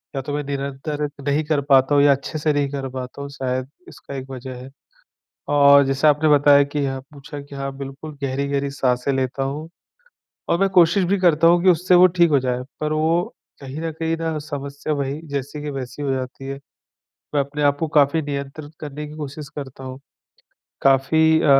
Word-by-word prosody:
या 135 Hz, -, -1 dB
तो 145 Hz, +2 st, -5 dB
मैं 145 Hz, -, -2 dB
निरंतर 140 Hz, +2 st, -3 dB, 0.2 s
नहीं 145 Hz, +2 st, +2 dB
कर 150 Hz, -2 st, +1 dB
पाता 135 Hz, +1 st, +5 dB
हूँ 140 Hz, -, +5 dB
या 145 Hz, -, +6 dB
अच्छे 140 Hz, +3 st, -2 dB
से 150 Hz, 0 st, +1 dB
नहीं 145 Hz, -1 st, 0 dB
कर 135 Hz, -2 st, -3 dB
पाता 130 Hz, +1 st, -7 dB
हूँ, 140 Hz, -, -6 dB
शायद 130 Hz, -1 st, -3 dB, 0.2 s
इसका 140 Hz, -, -10 dB
एक 135 Hz, 0 st, -7 dB
वजह 130 Hz, -1 st, -7 dB
है। 130 Hz, -, -10 dB, 0.8 s
और 140 Hz, -1 st, +6 dB
जैसा 135 Hz, +3 st, +2 dB
आपने 150 Hz, +2 st, +2 dB
बताया 145 Hz, 0 st, +6 dB
कि 145 Hz, +1 st, -5 dB
यहाँ 135 Hz, -1 st, -2 dB
पूछा 145 Hz, 0 st, -9 dB
कि 140 Hz, 0 st, -13 dB
हाँ 135 Hz, 0 st, -4 dB
बिल्कुल, 140 Hz, +3 st, -8 dB
गहरी-गहरी 140 Hz, +1 st, -1 dB
साँसें 130 Hz, -1 st, 0 dB
लेता 130 Hz, 0 st, -1 dB
हूँ 150 Hz, +4 st, -4 dB, 0.8 s
और 170 Hz, -, +2 dB
मैं 195 Hz, 0 st, +3 dB
कोशिश 180 Hz, +1 st, +4 dB
भी 200 Hz, -, +3 dB
करता 165 Hz, -3 st, +4 dB
हूँ 175 Hz, +1 st, +5 dB
कि 190 Hz, -, +6 dB
उससे 180 Hz, +1 st, +4 dB
वो 180 Hz, +1 st, +8 dB
ठीक 170 Hz, -1 st, +5 dB
हो 140 Hz, -, +5 dB
जाए। 125 Hz, -1 st, -2 dB, 0.2 s
पर 155 Hz, 0 st, -1 dB
वो 160 Hz, +3 st, +2 dB, 0.4 s
कहीं 135 Hz, +2 st, -7 dB
न 165 Hz, -, -2 dB
कहीं 165 Hz, 0 st, 0 dB
ना 165 Hz, -1 st, -2 dB
समस्या 145 Hz, 0 st, -5 dB
वही, 140 Hz, +1 st, -2 dB
जैसी 140 Hz, +1 st, -4 dB
की 150 Hz, -, -4 dB
वैसी 135 Hz, +1 st, -6 dB
हो 140 Hz, -2 st, -1 dB
जाती 130 Hz, +1 st, -5 dB
है। 135 Hz, 0 st, -5 dB, 0.8 s
मैं 145 Hz, -, +4 dB
अपने 145 Hz, +2 st, -4 dB
आप 145 Hz, 0 st, +3 dB
को 160 Hz, -, 0 dB
काफ़ी 150 Hz, +1 st, +3 dB
नियंत्रित 145 Hz, +1 st, -6 dB
करने 150 Hz, 0 st, -6 dB
की 150 Hz, -, -10 dB
कोशिश 145 Hz, -1 st, -7 dB
करता 135 Hz, -2 st, -7 dB
हूँ। 130 Hz, 0 st, -7 dB, 0.8 s
काफ़ी 160 Hz, +4 st, +4 dB
अ, -, -, +1 dB
140 Hz, 205 wpm, -21 LUFS, 135-155 Hz, 0.8 s, वो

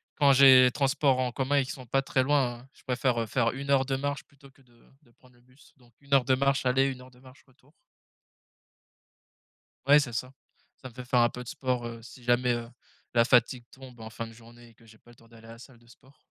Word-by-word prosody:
quand 140 Hz, -1 st, +4 dB
j'ai 130 Hz, -1 st, +7 dB
transport 135 Hz, -1 st, +1 dB
en 125 Hz, -1 st, -1 dB
commun 135 Hz, +2 st, 0 dB
qui 130 Hz, -, -7 dB
sont 130 Hz, -, -10 dB
pas 135 Hz, +3 st, 0 dB
très 135 Hz, -1 st, -1 dB
loin, 130 Hz, -3 st, -1 dB
je -, -, -24 dB
préfère 125 Hz, -3 st, -1 dB
faire 115 Hz, 0 st, 0 dB
1 140 Hz, +1 st, -8 dB
heure 135 Hz, -1 st, +3 dB
de 135 Hz, 0 st, -2 dB
marche 145 Hz, +2 st, -4 dB
plutôt 140 Hz, -1 st, -20 dB
que 135 Hz, -, -27 dB
de 120 Hz, -2 st, -26 dB, 0.2 s
de 120 Hz, -, -27 dB
prendre 125 Hz, +1 st, -25 dB
le 120 Hz, -, -26 dB
bus, 125 Hz, +3 st, -24 dB
donc 120 Hz, -2 st, -25 dB
1 140 Hz, 0 st, -7 dB
heure 135 Hz, -2 st, +4 dB
de 130 Hz, -, +2 dB
marche 140 Hz, 0 st, 0 dB
aller 130 Hz, +2 st, +2 dB
1 130 Hz, -2 st, -6 dB
heure 130 Hz, 0 st, -16 dB
de 125 Hz, -, -22 dB
marche 130 Hz, 0 st, -18 dB
retour. 135 Hz, +2 st, -28 dB, 2.2 s
Ouais, 145 Hz, +1 st, +7 dB
c'est 135 Hz, -5 st, -4 dB
ça. 125 Hz, +3 st, -5 dB, 0.5 s
Ça 130 Hz, -, -9 dB
me -, -, -21 dB
fait 125 Hz, +1 st, -10 dB
faire 125 Hz, 0 st, +1 dB
un 120 Hz, 0 st, +3 dB
peu 125 Hz, -, -9 dB
de -, -, -17 dB
sport, 125 Hz, -1 st, -3 dB
heu, 115 Hz, -1 st, -8 dB
si 120 Hz, +2 st, -15 dB
jamais, 120 Hz, +1 st, +1 dB
heu, 120 Hz, 0 st, -5 dB, 0.5 s
la 120 Hz, -1 st, +4 dB
fatigue 120 Hz, 0 st, +1 dB
tombe 130 Hz, -3 st, -15 dB
en 110 Hz, 0 st, -9 dB
fin 115 Hz, +1 st, -7 dB
de 115 Hz, -, -14 dB
journée 120 Hz, +1 st, -17 dB
et -, -, -22 dB
que 115 Hz, +1 st, -24 dB
j'ai 110 Hz, 0 st, -19 dB
pas 120 Hz, -, -21 dB
le -, -, -19 dB
temps 115 Hz, -, -22 dB
d'aller 115 Hz, -1 st, -17 dB
à -, -, -12 dB
la 115 Hz, -, -13 dB
salle 125 Hz, 0 st, -16 dB
de 120 Hz, 0 st, -25 dB
sport. 130 Hz, +3 st, -22 dB
125 Hz, 255 wpm, -27 LUFS, 120-135 Hz, 2.2 s, j'ai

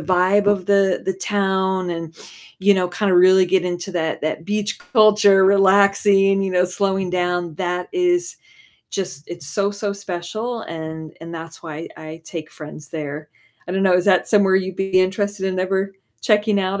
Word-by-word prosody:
vibe 190 Hz, +3 st, +2 dB
of 200 Hz, -3 st, +1 dB
the 195 Hz, -2 st, +2 dB
the 190 Hz, -, 0 dB
town 190 Hz, -2 st, -1 dB
and, 165 Hz, -1 st, -6 dB, 0.5 s
you 200 Hz, +1 st, +5 dB
know, 180 Hz, -1 st, +1 dB
kinda 185 Hz, +1 st, 0 dB
really 185 Hz, +1 st, +6 dB
get 185 Hz, 0 st, +1 dB
into 175 Hz, +1 st, -4 dB
that 160 Hz, -2 st, -2 dB
that 155 Hz, +1 st, -3 dB
beach 210 Hz, +1 st, -2 dB
culture, 210 Hz, -5 st, +4 dB
relaxing, 195 Hz, 0 st, +4 dB
you 190 Hz, -, -2 dB
know, 180 Hz, 0 st, +3 dB
slowing 190 Hz, 0 st, -1 dB
down. 175 Hz, -2 st, -1 dB
That 180 Hz, -1 st, -3 dB
is 360 Hz, 0 st, 0 dB, 0.5 s
just 185 Hz, -7 st, -4 dB
it's 170 Hz, -4 st, -8 dB
so, 200 Hz, +7 st, -1 dB
so 205 Hz, 0 st, -3 dB
special 200 Hz, +5 st, -5 dB
and 160 Hz, -1 st, -8 dB
and 165 Hz, +1 st, -9 dB
that's 165 Hz, +1 st, -9 dB
why 160 Hz, 0 st, -7 dB
I 160 Hz, +1 st, -10 dB
take 160 Hz, -2 st, -8 dB
friends 150 Hz, -1 st, -11 dB
there. 150 Hz, -1 st, -6 dB, 0.4 s
I -, -, -3 dB
don't 190 Hz, 0 st, 0 dB
know, 190 Hz, -2 st, +3 dB
is 180 Hz, -, +2 dB
that 185 Hz, -2 st, +3 dB
somewhere 195 Hz, -3 st, +4 dB
you'd 190 Hz, -1 st, -3 dB
be 195 Hz, -1 st, +1 dB
interested 190 Hz, +1 st, -1 dB
in 185 Hz, -1 st, -2 dB
ever 190 Hz, +1 st, -1 dB, 0.3 s
checking 210 Hz, -1 st, +2 dB
out? 190 Hz, +1 st, -2 dB
190 Hz, 175 wpm, -20 LUFS, 175-200 Hz, 0.5 s, really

